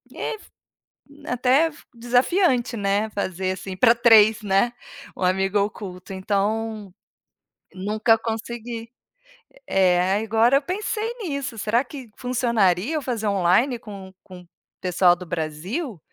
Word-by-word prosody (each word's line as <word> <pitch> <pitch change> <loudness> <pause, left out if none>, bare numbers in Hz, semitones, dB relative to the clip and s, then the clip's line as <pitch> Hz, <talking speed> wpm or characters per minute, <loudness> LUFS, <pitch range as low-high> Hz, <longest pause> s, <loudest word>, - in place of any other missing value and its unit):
f 435 - -5 0.8
até 255 +5 +3
f 310 - -12
desafiante, 245 +2 +1
né, 205 +1 0
fazer 185 -2 -2
assim 190 0 -6
para 230 +3 +6
3, 225 -2 +5
né, 200 +3 +2 0.4
um - - -11
amigo 190 +2 +1
oculto 195 -2 -5
então, 210 +2 -2 0.8
nunca 215 +4 +1
consegui. 230 0 -5 0.8
É, 185 0 +3
agora 225 +4 +3
eu 285 - +2
pensei 425 +6 -3
nisso, 280 - -4
será 225 +4 +1
que 255 -4 -10
funcionaria 235 - +1
eu - - 0
fazer 235 -5 -3
online 200 +7 +2
com 200 -4 -10
com 185 -1 -12
o 175 - -23 0.3
pessoal 180 -1 +3
do 180 - -9
Brasil? 175 - -4
220 Hz, 125 wpm, -23 LUFS, 190-245 Hz, 0.8 s, para